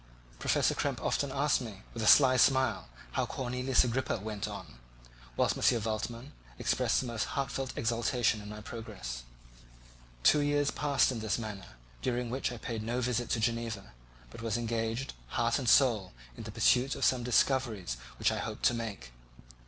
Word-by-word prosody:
Professor - - +2
Krempe - - -1
often 140 -1 0
asked 140 0 +2
me, 105 -5 -8
with 115 - -5
a 110 - 0
sly 130 0 +7
smile, 130 - +3 0.2
how - - 0
Cornelius 125 0 +1
Agrippa 125 0 -1
went 105 0 -4
on, - - -9 0.6
whilst - - +2
M. 115 -4 +2
Waldman 115 +5 -3 0.3
expressed - - +1
the - - -5
most 115 -3 -2
heartfelt 135 -1 -2
exultation 115 -1 +1
in 105 - -9
my 105 0 -7
progress. 100 - -7 1.0
Two 150 - +6
years 145 0 +2
passed 145 -2 +2
in 120 - -3
this 110 -1 -1
manner, 105 - -7 0.3
during 125 -1 -1
which 130 +1 -1
I 120 - -6
paid 115 -1 -4
no 120 +3 -2
visit 120 -1 -1
to 115 - +1
Geneva, 115 - -2 0.4
but - - -10
was 115 0 -1
engaged, 115 +2 -2 0.2
heart 120 +3 +2
and 125 -4 0
soul, 115 -9 +4 0.2
in - - -8
the - - -6
pursuit 130 +3 +3
of 140 - 0
some 130 -1 +3
discoveries 120 - +1 0.2
which - - +2
I - - -2
hoped - - -5
to - - +5
make. 110 - -5
120 Hz, 170 wpm, -31 LUFS, 110-130 Hz, 1.0 s, sly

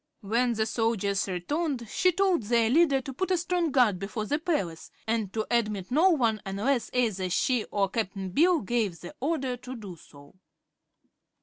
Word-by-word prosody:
When 235 +4 +1
the 220 -1 0
soldiers 220 -3 0
returned 240 - -2
she 365 +11 +2
told 370 -2 +2
their 230 +1 +2
leader 285 -2 +4
to 270 +1 -7
put 375 +8 -2
a 370 - +2
strong 350 -1 0
guard 245 -9 +3
before 210 +3 -4
the 295 +7 -1
palace 195 - -2 0.2
and 220 -3 -1
to 220 -1 -1
admit 210 -5 0
no 320 +8 +5
one 230 - +1
unless 220 +7 -1
either 215 -7 0
she 240 +6 +1
or 200 -1 0
Cap'n 195 -2 -3
Bill 335 - +3
gave 210 -5 -1
the 175 - -9
order 270 -4 -1
to 250 +1 -8
do 205 -6 -8
so. 145 -2 -17
230 Hz, 175 wpm, -27 LUFS, 200-280 Hz, 0.2 s, no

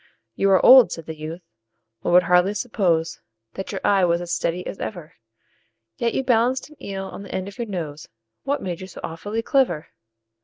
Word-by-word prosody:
"You 195 - +2
are 190 - +4
old," 260 -2 +9
said 165 - -6
the 160 - -6
youth, 160 +3 -7 0.6
"one 175 - +1
would 180 - +7
hardly 180 +3 +3
suppose 175 -8 0 0.3
That 195 - -6
your 195 - -4
eye 195 -2 +3
was 170 -1 +2
as 175 -1 -4
steady 175 +2 -1
as - - -6
ever; 175 -6 -6 0.8
Yet 235 - -1
you 265 - 0
balanced 255 +3 +1
an 305 - -17
eel 195 -1 -4
on 190 - -8
the 200 - -10
end 185 0 -3
of 200 - -11
your 235 - -3
nose 160 -7 -6 0.3
What 280 0 -2
made 180 -2 -4
you 185 - -7
so 190 - -11
awfully 205 +7 -4
clever?" 235 - +1
190 Hz, 200 wpm, -23 LUFS, 170-225 Hz, 0.8 s, old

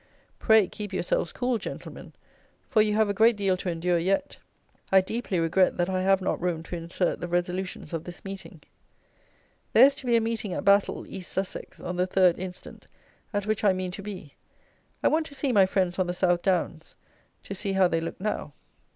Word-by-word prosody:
Pray, 220 -3 +5
keep 210 -2 -7
yourselves 175 -2 -1
cool, 245 -2 -1
gentlemen; - - -8 0.5
for 215 - +3
you 210 -1 +2
have 220 0 +3
a 200 - 0
great 225 +3 +4
deal 195 -2 +2
to 180 0 -4
endure 170 +1 0
yet. 190 +4 -1 0.5
I 190 - +7
deeply 195 -1 -2
regret 165 +3 +2
that 175 +1 0
I 185 0 0
have 195 0 +3
not - - -1
room 170 -2 -1
to 175 - -6
insert 170 +2 -2
the 175 - -3
resolutions 180 +1 -3
of 165 -1 -3
this 175 +2 -10
meeting. 195 -4 -8 1.1
There - - +9
is 280 - +4
to 260 - -8
be 240 - +4
a - - +5
meeting 225 -4 -2
at - - -4
Battle 200 0 +3
(East 185 -2 -8
Sussex) 190 0 -5
on 180 0 -5
the 180 +1 +1
3rd 185 -2 +3
instant, 185 0 -9 0.4
at 205 -2 -2
which 215 0 -1
I 200 -2 +5
mean 185 -1 -3
to 195 - -7
be. 190 -8 -8 0.7
I - - +5
want 315 0 +1
to 285 - -12
see 270 0 0
my 195 -5 +5
friends 185 -1 0
on 185 - +1
the 175 - -2
South 175 -1 +2
Downs. 175 -4 -1 0.5
To - - -6
see 195 0 -2
how 190 -1 +4
they 165 -1 0
look 165 - -5
now. 190 -7 -3
190 Hz, 205 wpm, -27 LUFS, 175-205 Hz, 1.1 s, There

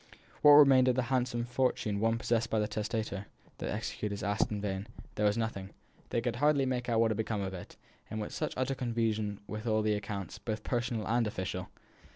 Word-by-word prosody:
What 150 - +9
remained 135 -3 +8
of 125 - +3
the 130 - +1
handsome 120 -2 0
fortune 120 -4 0
once 115 +1 +2
possessed 115 0 0
by 110 - 0
the 105 -1 +1
testator? 110 -1 -3 0.3
The - - -3
executors 100 0 -3
asked 100 -1 +1
in 105 - -3
vain; 100 0 -3 0.3
there 105 - +2
was 105 - +1
nothing. 105 -4 -3 0.4
They 115 - 0
could 120 0 -2
hardly 145 -2 +3
make 125 -1 -2
out 115 -1 +2
what 115 -1 +4
had 110 - -1
become 110 -2 -1
of 95 -1 -3
it, 90 - -9 0.3
in 110 -1 -3
such - - -3
utter 130 +1 0
confusion 115 -5 -1
were 110 +1 -5
all 110 -1 +2
the 105 0 +2
accounts, 100 -2 -4
both 110 +1 -4
personal 120 -3 -1
and 115 +1 +2
official. 95 -2 -4
110 Hz, 200 wpm, -31 LUFS, 105-120 Hz, 0.4 s, What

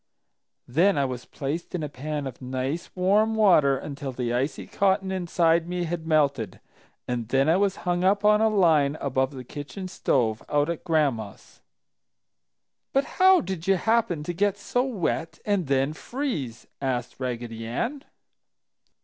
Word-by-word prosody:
"Then 165 +8 +3
I 140 - +2
was 125 -2 -5
placed 150 +6 -4
in 165 - -2
a - - -2
pan 145 +1 -4
of 130 -1 -7
nice 130 +5 -3
warm 205 +4 +3
water 170 -11 +5
until 140 -1 -6
the 120 -1 -2
icy 135 +4 -1
cotton 190 -1 +1
inside 170 -2 +1
me 180 0 -2
had 165 -1 -4
melted, 140 - +1 0.5
and 120 -2 -2
then 135 +2 +3
I 165 +3 +4
was 195 -1 +1
hung 175 0 +1
up 200 +2 +2
on 210 0 +5
a 220 - +4
line 160 -8 +3
above 130 -1 0
the 135 -3 -8
kitchen 145 - -7
stove, 115 -11 0
out 150 +2 +2
at 170 - -6
Gran'ma's." 140 -11 -1 1.3
"But 275 +1 +3 0.2
how 375 -2 +7
did 190 - -5
you 195 - +5
happen 200 -6 +1
to 175 - -3
get 200 +3 +1
so 245 +4 0
wet 185 -9 -2
and 200 -6 0
then 135 +2 +1
freeze?" 155 - -4 0.2
asked 125 -3 -2
Raggedy 120 -3 -4
Ann. 245 - -3
160 Hz, 160 wpm, -26 LUFS, 135-190 Hz, 1.3 s, how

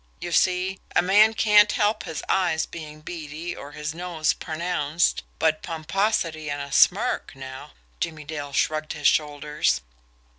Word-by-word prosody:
You 175 - -5
see, 185 +2 +2 0.2
a - - +5
man 210 +4 +5
can't 210 -1 +5
help 210 0 +1
his 160 - -5
eyes 160 -4 +1
being 155 -2 -9
beady 160 +1 -6
or 145 +1 -10
his 150 +1 -4
nose 170 -2 -1
pronounced, 165 -1 -1 0.2
but 155 -1 +1
pomposity 165 -1 -1
and 145 0 -3
a 140 0 -6
smirk, - - +3
now 130 - -9
" - - -36
Jimmie 155 -2 -3
Dale 145 -1 -6
shrugged 155 +2 0
his 150 -2 +1
shoulders. 150 - +1
155 Hz, 150 wpm, -24 LUFS, 150-180 Hz, 0.2 s, a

